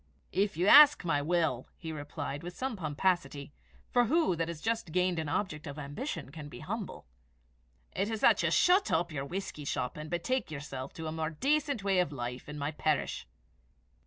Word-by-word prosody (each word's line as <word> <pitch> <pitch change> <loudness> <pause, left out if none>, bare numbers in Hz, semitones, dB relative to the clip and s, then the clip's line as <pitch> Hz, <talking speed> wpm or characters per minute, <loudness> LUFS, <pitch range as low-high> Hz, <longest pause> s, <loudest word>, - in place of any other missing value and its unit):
"If 195 -2 0
you 175 - +1
ask 295 -1 +8
my 145 -4 +1
will," 160 -5 0
he 160 -2 -6
replied, 145 -1 -5
with 175 +1 -8
some 260 -2 -2
pomposity, 155 -3 -1 0.4
for 245 -1 +4
who 310 - +2
that 165 0 -1
has 170 -2 -5
just 225 -3 -2
gained 180 0 +1
an 155 -2 -3
object 155 -2 -2
of 145 +1 -7
ambition 145 - -5
can 150 -1 -8
be - - -10
humble? 205 +5 -5 0.9
"it 200 +2 -1
is 220 -1 -3
that - - +5
you - - +2
shut 370 +3 +4
up 170 +2 +1
this 140 -3 -5
whisky 180 -5 -5
shop, 125 -2 -2
and 155 0 -7
betake 250 +11 -1
yourself 140 -3 -6
to 160 - -7
a 155 - -3
more 160 0 -2
decent 280 - 0
way 195 -2 +2
of 180 -5 +1
life 125 0 -5
in 150 - -6
my 145 +1 -2
parish." 150 - -1
165 Hz, 190 wpm, -31 LUFS, 145-200 Hz, 0.9 s, ask